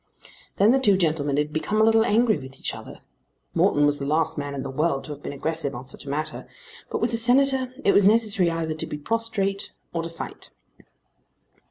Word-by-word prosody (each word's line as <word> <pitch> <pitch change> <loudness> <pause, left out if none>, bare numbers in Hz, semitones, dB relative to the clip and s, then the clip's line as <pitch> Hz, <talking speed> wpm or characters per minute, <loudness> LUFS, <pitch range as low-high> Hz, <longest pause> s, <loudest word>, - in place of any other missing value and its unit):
Then 205 +3 +5
the 270 - +4
two 205 -7 +4
gentlemen 150 -5 0
had 150 0 -1
become 205 +7 -1
a - - +5
little 225 0 +5
angry 225 -4 +3
with 130 -1 -11
each - - -4
other. - - -10 0.5
Morton 145 0 +3
was 145 0 +1
the 140 - -3
last 160 +2 +1
man 145 -1 -4
in 135 - -4
the 135 - -5
world 140 -1 0
to - - -8
have 145 0 -8
been - - -5
aggressive 150 0 -2
on 120 +2 -7
such 130 - -9
a - - -7
matter; 155 +3 -4 0.4
but - - -3
with 235 - +1
the 230 - +1
Senator 260 +2 +3
it 200 - +5
was 200 -1 +5
necessary 210 -5 +3
either 165 -1 -2
to 155 - -5
be 150 - -5
prostrate 200 +2 -2 0.2
or 165 - -1
to 165 - -5
fight. 165 - -8
165 Hz, 215 wpm, -24 LUFS, 145-220 Hz, 0.5 s, Then